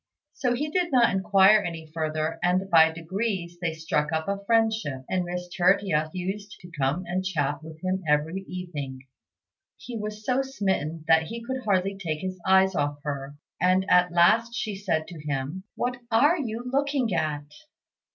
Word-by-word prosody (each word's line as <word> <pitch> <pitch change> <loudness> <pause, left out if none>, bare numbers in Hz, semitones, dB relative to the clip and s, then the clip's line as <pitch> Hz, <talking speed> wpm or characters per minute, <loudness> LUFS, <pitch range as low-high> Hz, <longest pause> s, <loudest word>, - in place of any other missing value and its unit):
So 250 -3 0
he 300 +4 -3
did 355 -1 0
not 245 -5 +4
inquire 195 +2 +5
any 165 -4 -5
further; 155 0 -2
and 185 +2 +1
by 160 -1 +7
degrees 175 +1 -3
they 165 -2 -1
struck 155 -2 -1
up 160 0 -1
a 200 0 -2
friendship, 220 - +1
and 185 -1 0
Miss 180 0 -4
Tertia 180 -4 +2
used 195 +3 -5
to 175 -1 -12
come 145 +2 -1
and 180 +2 -2
chat 150 -6 -1
with 160 0 -11
him 185 +1 -1
every 150 +5 +1
evening. 145 -8 -6 0.8
He 245 - -8
was 210 0 -6
so 255 +1 +2
smitten 190 - -2
that 160 0 +4
he 230 +5 -6
could 260 +2 -4
hardly 195 -1 +1
take 155 -5 -3
his 185 -1 -4
eyes 190 0 +5
off 145 -3 -1
her, 140 -1 -4 0.3
and 185 +1 +3
at 180 0 +5
last 225 +7 +4
she 215 -3 -3
said 185 -5 -1
to 170 -4 -9
him, 145 +5 -4
"What 250 +1 -2
are 275 +9 +4
you 240 -7 -4
looking 270 -3 0
at?" 150 -3 -1
185 Hz, 170 wpm, -26 LUFS, 160-210 Hz, 0.8 s, by